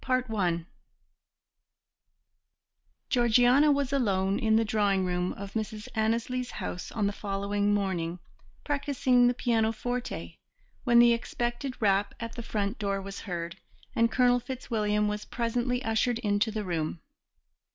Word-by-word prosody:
Chapter 255 -3 0
XI 175 -5 0 2.5
Georgiana 245 +4 +5
was 280 -1 0
alone 195 -7 +1
in 220 -1 +2
the 225 0 +3
drawing 205 -3 +1
room 180 0 -1
of 200 0 -8
Mrs. 220 0 -4
Annesley's 230 +3 0
house 180 - -5
on 215 -3 -1
the 200 - 0
following 200 0 -1
morning, 185 -4 -1 0.5
practising 265 -4 +2
the 245 - +2
pianoforte, 225 - -1 0.5
when 240 -1 +5
the 240 0 +7
expected 240 +2 -3
rap 200 -1 +2
at 230 -1 -5
the 240 - -6
front 210 -1 -2
door 200 -1 -1
was 195 0 -7
heard, 170 -4 -5 0.4
and 230 0 +3
Colonel 245 +1 +4
Fitzwilliam 215 -5 -1
was 210 0 -3
presently 245 +2 -1
ushered 225 +2 +1
into 210 -1 +1
the 215 -1 -3
room. 165 -2 -2
220 Hz, 130 wpm, -28 LUFS, 200-245 Hz, 2.5 s, the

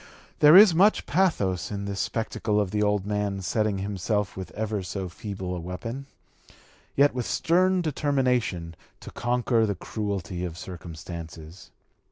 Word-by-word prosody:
There 150 +2 +8
is 205 -3 +9
much 195 +6 +4
pathos 125 - +1
in 100 -1 -4
this 100 -1 -4
spectacle 110 -1 -1
of 100 -3 -1
the 105 - 0
old 105 -2 +1
man 105 -1 -2
setting 105 +2 0
himself 100 +1 -2
with 95 -1 -6
ever 110 -1 -2
so 95 0 -5
feeble 95 0 -5
a - - -4
weapon, 115 +10 -6 0.9
yet 145 +1 +4
with 125 -2 -3
stern 180 +2 +2
determination, 125 - 0 0.3
to - - -9
conquer 120 -1 +1
the 100 - -1
cruelty 95 -2 -4
of 85 -2 -5
circumstances. 85 -1 -9
105 Hz, 145 wpm, -26 LUFS, 90-125 Hz, 0.9 s, is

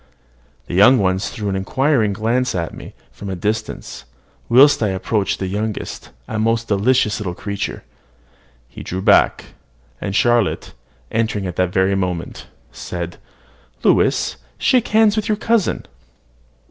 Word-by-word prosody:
The - - -8
young 105 +8 +6
ones 95 -2 0
threw 105 -2 -4
inquiring 110 +4 +1
glances 120 +4 0
at 85 -2 -3
me - - -11 0.2
from 100 - -8
a 95 - -3
distance; 105 +4 -4 0.4
whilst 135 +4 +6
I 110 - +2
approached 95 +1 -1
the 95 - -3
youngest, 105 +3 -4 0.2
a 110 - -3
most 115 +1 0
delicious 105 +2 +2
little 90 -4 -4
creature. 100 0 -4 0.8
He - - -11
drew 95 +1 -5
back; - - +3 0.5
and 100 -1 -3
Charlotte, 120 -2 +1 0.4
entering 110 -3 -1
at 90 - -4
the 90 - +2
very 95 +2 +1
moment, 90 -3 -3 0.2
said, 85 -1 -6 0.7
"Louis, - - +2 0.2
shake 250 -2 +2
hands 215 -1 +4
with 215 -1 -1
your 210 - +1
cousin." 225 -1 0
105 Hz, 135 wpm, -19 LUFS, 95-120 Hz, 0.8 s, young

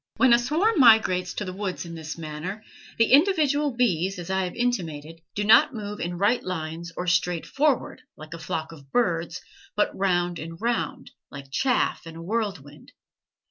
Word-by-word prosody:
When 255 -2 +5
a 235 - +6
swarm 320 - +1
migrates 215 -7 +5
to 205 - -3
the 185 - -5
woods 190 -2 -4
in 170 - -8
this 160 -1 -7
manner, 165 +6 -6 0.3
the 230 - +3
individual 295 -3 +4
bees, 195 -6 +1
as 175 +1 -6
I 190 0 +1
have 180 - -6
intimated, 165 -10 -3
do 205 - -1
not 240 +7 +5
move 210 -1 -6
in 175 +1 -3
right 205 +6 +2
lines 165 -1 -5
or 180 - -3
straight 175 -1 +1
forward, 290 -2 0 0.2
like 155 +1 -10
a 165 - -8
flock 160 0 -4
of 140 -4 -15
birds, 175 -8 0 0.3
but 210 - +1
round 175 -3 0
and 165 +2 -8
round, 235 +2 -2 0.2
like 140 -1 -10
chaff 250 - 0
in 165 - -9
a 165 - -8
whirlwind. 185 -9 -4
185 Hz, 180 wpm, -25 LUFS, 165-235 Hz, 0.3 s, a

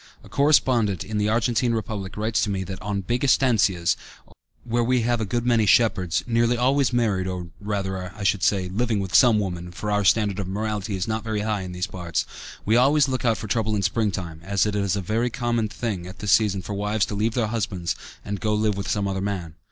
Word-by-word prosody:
A - - -14
correspondent 120 - +3
in 105 +1 -3
the 105 0 +1
Argentine 115 +1 +1
Republic 105 -4 -4
writes 110 +1 0
to - - -1
me 95 -1 -1
that 95 0 -7
"on 100 0 -2
big 120 +7 -2
estancias, 105 -10 +3 0.7
where 120 0 0
we 125 +1 +2
have 120 0 0
a - - 0
good 120 +4 -2
many 115 -3 +3
shepherds, 95 -5 +3
nearly 120 0 +2
always 135 +2 +2
married, 105 -6 +1
or, 90 -2 -5
rather, 95 -3 -3
I 105 - -7
should 100 -1 +2
say, 95 -1 +2
living 110 +3 0
with 95 -3 -4
some 120 -4 +6
woman 90 -4 -3
(for 105 +3 -4
our 105 0 +2
standard 100 0 +2
of 100 - -3
morality 105 0 -2
is 95 -1 -2
not 110 0 -2
very 110 -2 -2
high 105 -1 -1
in 90 -1 -6
these 90 0 -2
parts), 85 -3 -3 0.4
we 110 - +3
always 140 +4 +4
look 130 -2 -2
out 115 -2 +3
for - - -6
trouble 110 +1 0
in 100 - -1
springtime, 95 -5 -1
as 100 +1 +1
it 105 -1 -1
is 100 -1 0
a 100 - -2
very 110 +6 0
common 120 -2 -1
thing 100 -5 -4
at 95 - -10
this 105 - -1
season 100 -4 +3
for 105 - -5
wives 105 +1 0
to - - -6
leave 110 +3 0
their 120 -3 +1
husbands 90 -8 -2 0.3
and 100 -1 -3
go 105 -1 +1
and 105 - 0
live 105 -2 +1
with 100 - -4
some 100 -1 0
other 95 -1 -2
man." 95 -5 -3
105 Hz, 230 wpm, -24 LUFS, 95-115 Hz, 0.7 s, some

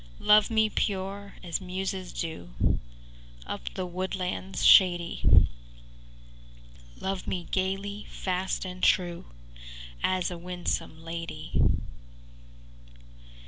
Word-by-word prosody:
IX - - -13
Love 210 0 +7
me 220 -1 +3
pure, 200 -1 -2
as 170 -1 -2
muses 185 0 -3
do, 85 - -2 0.7
Up - - -5
the 185 - -2
woodlands 185 +1 -3
shady: 175 -3 +6 1.5
Love 190 -1 -3
me 180 -2 -2
gaily, 195 +2 -2
fast 185 +1 -2
and 180 0 -7
true, 175 -2 +2 0.8
As 185 -1 +1
a 175 - -6
winsome 175 -2 -3
lady. 165 -1 -3
185 Hz, 95 wpm, -28 LUFS, 175-195 Hz, 1.5 s, Love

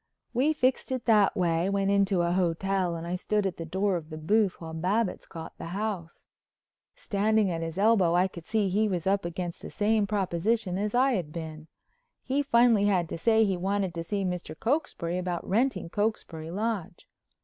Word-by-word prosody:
We 265 +6 +3
fixed 260 -2 0
it 255 -2 -2
that 215 -2 +4
way, 170 0 +1
went 200 0 +1
into 195 -3 +2
a 170 - +1
hotel, 180 0 0
and 165 0 -6
I 170 - -3
stood 205 +3 0
at 190 -3 -2
the 165 - -6
door 190 +2 0
of 160 -2 -9
the 155 - -7
booth 195 +5 +1
while 160 -1 -7
Babbitts 185 +6 -1
got 165 -1 -9
the - - -6
house. 200 -6 -4 0.7
Standing 215 - +1
at 165 -1 -3
his 165 +1 -5
elbow 195 -5 +4
I 180 +2 +4
could 170 -3 -11
see 220 -2 +1
he 210 +4 +2
was 180 -5 -2
up 195 -1 +1
against 175 0 -4
the - - -7
same 215 -1 +1
proposition 195 0 0
as 210 +2 -1
I 265 +2 +4
had 180 -10 -2
been. 155 -1 -7 0.6
He 275 +2 0
finally 235 -6 +4
had 180 -5 +2
to - - -4
say 220 +3 +4
he 195 -2 0
wanted 190 0 -1
to 165 -1 -4
see 200 +3 -2
Mr. 175 -3 -4
Cokesbury 220 - -1
about 180 -1 -3
renting 210 -2 +1
Cokesbury 170 -5 -2
Lodge. 205 -1 -3
195 Hz, 195 wpm, -28 LUFS, 170-215 Hz, 0.7 s, that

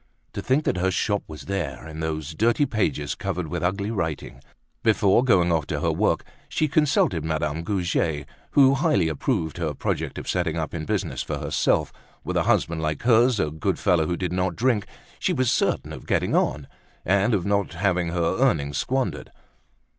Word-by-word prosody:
To - - -4
think 135 +4 +1
that 95 - 0
her 95 +1 +1
shop 100 +2 0
was 75 -1 -9
there, 90 -6 -4
in 80 0 -8
those 80 -1 -3
dirty 115 - +2
pages, 100 - -1
covered 85 -2 -4
with 85 0 -3
ugly 100 +4 -1
writing! 80 - -4 0.4
Before 105 0 +3
going 90 -9 +3
off 80 -3 0
to 75 - -2
her 80 - +1
work, 85 0 +1 0.3
she 155 - +1
consulted 140 - +2
Madame 80 0 -1
Goujet, 85 -5 -1 0.3
who 135 -1 +6
highly 100 - +2
approved 80 +2 -2
her 80 -4 -2
project - - -2
of - - -7
setting 85 -3 0
up 80 -2 -3
in 80 -2 -4
business - - -2
for - - -3
herself; - - 0 0.3
with - - -3
a - - +3
husband 85 -1 +1
like 75 -2 -2
hers, 120 -1 +4
a 75 -3 0
good 80 0 -1
fellow 80 -3 +2
who 85 - -1
did 90 0 -2
not 90 -1 0
drink, 115 -4 +1 0.3
she 185 - +1
was 130 -6 +1
certain - - 0
of - - -10
getting - - +1
on, 70 0 0 0.4
and 100 +4 +3
of 90 - -1
not 100 -3 0
having 90 -1 +1
her 85 +1 0
earnings 70 - +1
squandered. 125 - -2
90 Hz, 185 wpm, -24 LUFS, 80-105 Hz, 0.4 s, who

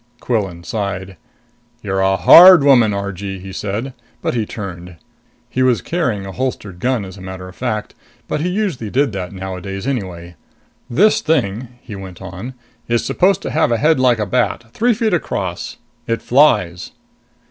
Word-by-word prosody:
Quillan 95 -8 -2
sighed. 95 0 -4 0.7
"You're 95 -2 -1
a 95 0 +3
hard 180 - +9
woman, 125 -6 +5
Argee," 100 -1 -4
he 95 +1 -9
said. 110 +8 -4 0.3
But - - 0
he 115 -3 -1
turned. 90 -4 -7 0.5
He 130 - -2
was 130 -2 +2
carrying 130 - -1
a 95 - -6
holstered 105 -6 -4
gun, 125 -2 0
as 95 +1 -10
a - - -11
matter 95 0 -8
of 90 - -13
fact; 110 -4 -3 0.3
but 150 - -2
he 175 - 0
usually 180 - -2
did 135 +3 +1
that 95 -3 -5
nowadays 95 +1 -6
anyway. 90 -10 -4 0.5
"This 205 - +3
thing," 125 -7 0
he 105 - -9
went 95 -2 -9
on, 95 +7 -8 0.3
"is 120 0 0
supposed 185 0 +2
to - - -4
have 160 -6 +2
a 115 - +2
head 155 +2 +3
like 125 -2 +3
a 105 - -1
bat, 115 +1 -1
three 235 0 +2
feet 220 -2 0
across. 95 - -3 0.3
It 115 0 -2
flies." 110 - +2
105 Hz, 170 wpm, -18 LUFS, 95-130 Hz, 0.7 s, hard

